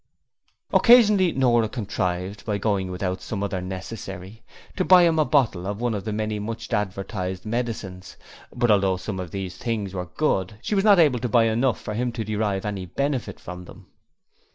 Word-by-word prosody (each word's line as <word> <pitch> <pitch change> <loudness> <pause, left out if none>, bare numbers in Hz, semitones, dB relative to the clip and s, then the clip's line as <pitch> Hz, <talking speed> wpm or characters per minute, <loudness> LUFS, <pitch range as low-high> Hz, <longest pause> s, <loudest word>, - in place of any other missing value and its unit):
Occasionally 210 -7 +6
Nora 120 -5 +2
contrived 95 -4 -3
by 105 -2 -1
going 100 -2 -1
without 90 0 -3
some 100 -2 -4
other 95 -2 -2
necessary 95 +2 -7 0.3
to 185 - 0
buy 180 -1 +7
him 165 -2 +3
a 155 - +4
bottle 110 -12 +1
of 100 +1 -4
one 120 -1 0
of 100 -1 -4
the 110 - -2
many 110 0 -2
much 110 +2 -5
advertised 95 -1 -3
medicines; 105 -5 -4 0.3
but 120 -2 +1
although 95 -2 +3
some 95 0 -5
of 90 -2 -5
these 95 -1 -5
things 105 -5 -3
were 90 -1 -4
good 95 - -1
she - - -2
was 195 -1 +2
not 205 -2 +6
able 145 -8 +4
to 125 - -2
buy 115 +1 +4
enough 115 +3 +1
for 105 - -6
him 120 +3 -1
to 115 - -3
derive 105 -2 -2
any 100 -3 -4
benefit 140 - -2
from 90 0 -8
them. - - -15
105 Hz, 185 wpm, -24 LUFS, 95-120 Hz, 0.3 s, buy